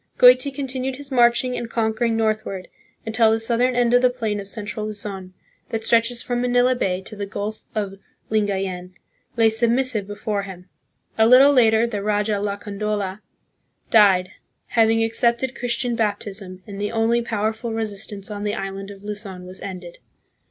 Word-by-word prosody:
Goiti - - +7
continued 265 -1 -3
his 280 +1 -8
marching 245 0 +3
and 235 - -4
conquering 225 0 0
northward 215 -4 -1 0.4
until 225 0 +3
the 225 - +2
southern 240 +2 +1
end 240 -1 +2
of 245 - +6
the 250 - +5
plain 225 -4 -2
of 195 - -7
central 210 0 -5
Luzon, 200 -3 -5 0.3
that 225 -1 -3
stretches 235 +1 +2
from 245 -1 -1
Manila 245 +1 +3
Bay 190 -7 -1
to 215 - -9
the 200 -1 -5
Gulf 210 +2 -5
of 195 -2 -3 0.3
Lingayen, 190 -4 -1 0.4
lay 225 -1 +5
submissive 235 -1 +1
before 205 0 -3
him. 190 -2 -10 0.5
A 220 - +6
little 265 +4 +7
later 225 -3 +4
the 215 -4 -3
raja 210 0 0
Lacandola 205 -1 -3 0.7
died, 190 -4 +5 0.4
having 225 -1 +3
accepted 235 +2 0
Christian 245 0 -1
baptism, 200 -4 -3
and 200 -1 -7
the 205 - -1
only 230 +1 +2
powerful 220 0 -2
resist 220 -2 -3
ance 200 0 -6
on 205 0 -5
the 210 0 -1
island 195 0 -5
of 200 -1 -11
Luzon 205 -3 -7
was 185 +1 -9
ended. 180 -3 -8
220 Hz, 160 wpm, -22 LUFS, 200-235 Hz, 0.7 s, Goiti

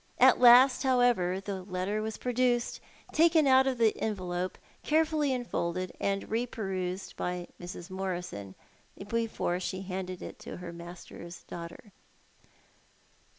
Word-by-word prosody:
At 255 0 +6
last, 250 +2 +8
however, 245 -9 +3
the 195 -1 -5
letter 185 +3 -2
was 220 0 -4
produced, 245 -1 0 0.3
taken 320 -1 +5
out 265 0 +6
of 260 -2 0
the 225 -2 +3
envelope, 185 -4 -2 0.2
carefully 310 -2 +2
unfolded, 185 -8 -2
and 195 0 -1
re 230 +3 -1
perused 190 -4 -4
by 180 0 -3
Mrs. 175 +1 -8
Morison 180 - -4 0.5
before 225 -5 -1
she 190 +1 -4
handed 185 -1 -5
it - - -8
to - - -8
her 175 -1 -7
master's 170 0 -10
daughter. 170 +5 -9
195 Hz, 125 wpm, -30 LUFS, 180-245 Hz, 0.5 s, last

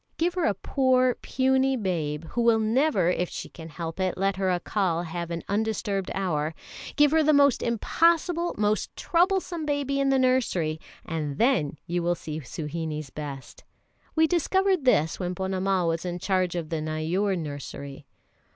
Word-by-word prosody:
Give 340 +2 +1
her 360 -2 0
a 205 - +2
poor, 255 +3 +2
puny 265 +1 +1
babe, 165 -7 -2
who 240 - -1
will 230 -1 +4
never, 225 - +2
if 180 -1 -1
she - - -6
can 165 -1 -10
help 165 +2 -6
it, 185 -1 0
let 195 +1 +1
her 190 -1 0
Accal 180 -1 0
have 170 0 -5
an 170 -1 -4
undisturbed 205 -2 -1
hour; 160 -5 -1 0.4
give 295 -1 +5
her 320 0 +4
the 310 0 +4
most 280 -3 +4
impossible, 335 - +1
most 210 0 +1
troublesome 355 -1 +1
baby 285 -2 -1
in 275 0 +2
the 270 - +3
nursery, 235 -12 +1 0.3
and 150 -4 -3
then 225 - +2
you 175 +1 -1
will 175 +1 +1
see 155 -2 -6
Suhinie's 155 0 -5
best. 140 -3 -8 0.5
We 320 0 +5
discovered 365 0 +1
this 160 -10 +3
when 180 -1 -2
Ponnamal 190 -1 0
was 165 0 -1
in 175 -1 -3
charge 185 -1 0
of 165 -3 -3
the 160 -2 -2
Neyoor 165 +6 -1
nursery. 145 -2 -7
190 Hz, 165 wpm, -26 LUFS, 165-265 Hz, 0.5 s, give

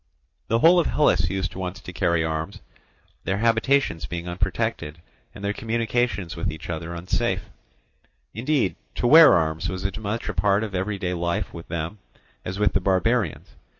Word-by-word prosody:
The 115 - +2
whole 170 +8 +6
of 170 - +1
Hellas 85 - +2
used 95 -2 -2
once 90 0 -5
to 90 - -10
carry 85 -2 +1
arms, 80 0 -3 0.6
their 95 - -1
habitations 115 - +1
being 85 0 -5
unprotected 85 -3 -2 0.4
and 100 - -7
their 100 - 0
communication 115 -3 -1
with - - -2
each 80 +2 -7
other 85 +1 -5
unsafe; 85 +2 -1 0.9
indeed, 125 -3 0 0.2
to - - -2
wear 160 +6 +9
arms 80 0 0
was 95 +1 -5
as 95 - -1
much 110 +2 -3
a - - -2
part 100 +1 +2
of 105 -3 -5
everyday 95 -1 -2
life 85 +3 -2
with 85 -1 -9
them 85 +4 -4 0.4
as 90 +1 -5
with 105 0 +2
the 95 - +1
barbarians. 100 +5 0
95 Hz, 165 wpm, -24 LUFS, 85-110 Hz, 0.9 s, wear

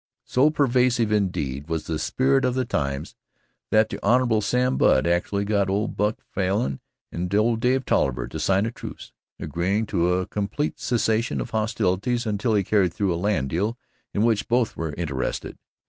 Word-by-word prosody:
So 135 +4 +3
pervasive, 125 -6 +2
indeed, 75 -9 -1
was 80 -1 -2
the 80 -2 -3
spirit 135 +1 +2
of 125 -1 +1
the 130 -1 0
times 70 -6 -2 0.6
that 110 0 +4
the - - -5
Hon. 120 0 +3
Sam 125 +5 +1
Budd 65 - +4
actually 90 +4 0
got 100 -2 +1
old 100 +3 -1
Buck 105 +1 0
Falin 95 -8 -1 0.3
and 90 +1 -4
old 110 +2 +2
Dave 130 +2 +1
Tolliver 60 -2 +1
to 80 - -6
sign 95 +6 +2
a 115 - -2
truce, - - -9 0.3
agreeing 95 +6 -1
to 90 -4 +1
a 90 0 0
complete 105 +11 -3
cessation 115 -1 0
of 115 - -5
hostilities 110 +2 0
until 110 +1 0
he 100 - +2
carried 95 -3 +1
through 100 -3 +1
a - - -2
land 90 -7 -1
deal 105 +8 -1 0.3
in 105 - 0
which 115 -3 +1
both 120 -1 +1
were 80 -3 -4
interested. 70 -7 -3
105 Hz, 175 wpm, -24 LUFS, 90-115 Hz, 0.6 s, that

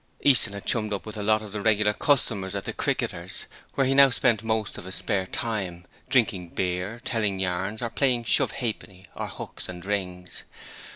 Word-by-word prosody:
Easton 125 -7 +4
had 100 - -7
chummed 110 -2 +1
up 100 - -4
with 110 - -6
a 105 - -4
lot 110 +1 +3
of 105 - -9
the 105 0 -3
regular 105 -1 +3
customers 105 -8 +1
at 100 - -3
the - - -3
'Cricketers', - - -2 0.3
where 135 - +3
he 135 - +2
now 140 0 +8
spent 115 -4 +2
most 110 -2 -1
of - - -10
his 95 - -5
spare 95 -2 -1
time, 95 -7 -3 0.2
drinking 105 -9 +2
beer, 90 +5 -2
telling 105 -5 0
yarns 95 +4 -2
or 115 - -1
playing 125 -2 +2
shove - - +3
ha'penny 105 -6 -4
or - - -3
hooks - - -7
and 90 0 -7
rings. 90 -3 -3
105 Hz, 190 wpm, -26 LUFS, 95-115 Hz, 0.3 s, now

